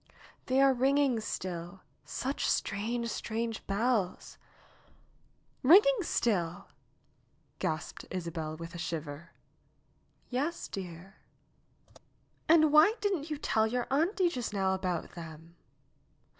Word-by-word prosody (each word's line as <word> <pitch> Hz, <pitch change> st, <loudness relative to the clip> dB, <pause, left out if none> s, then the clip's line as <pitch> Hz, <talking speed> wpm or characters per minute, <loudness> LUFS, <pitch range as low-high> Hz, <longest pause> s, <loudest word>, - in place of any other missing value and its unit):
^'They 260 Hz, +1 st, +2 dB
are 275 Hz, 0 st, +6 dB
ringing 270 Hz, -1 st, +2 dB
still. 180 Hz, -3 st, -5 dB, 0.2 s
Such 270 Hz, +2 st, -2 dB
strange, 230 Hz, +4 st, -1 dB
strange 225 Hz, 0 st, -3 dB
bells 205 Hz, -2 st, -1 dB, 0.6 s
!" -, -, -37 dB
''Kinging 415 Hz, -, +7 dB
still 175 Hz, -, -1 dB, 0.5 s
!" -, -, -40 dB
gasped 155 Hz, 0 st, -3 dB
Isabel 165 Hz, -3 st, -4 dB
with 165 Hz, +1 st, -8 dB
a 170 Hz, -, -7 dB
shiver. 160 Hz, -2 st, -5 dB, 1.0 s
"Yes, 285 Hz, +7 st, -2 dB
dear." 185 Hz, 0 st, -8 dB, 1.3 s
"And 310 Hz, -2 st, +6 dB
why 310 Hz, +9 st, +6 dB
didn't 370 Hz, -7 st, -1 dB
you 300 Hz, -, -2 dB
tell 220 Hz, -6 st, +1 dB
your 245 Hz, +2 st, -1 dB
auntie 345 Hz, +6 st, +2 dB
just 245 Hz, -9 st, -4 dB
now 190 Hz, -1 st, +1 dB
about 185 Hz, -3 st, -2 dB
them 165 Hz, 0 st, -10 dB
220 Hz, 110 wpm, -31 LUFS, 175-275 Hz, 1.3 s, Kinging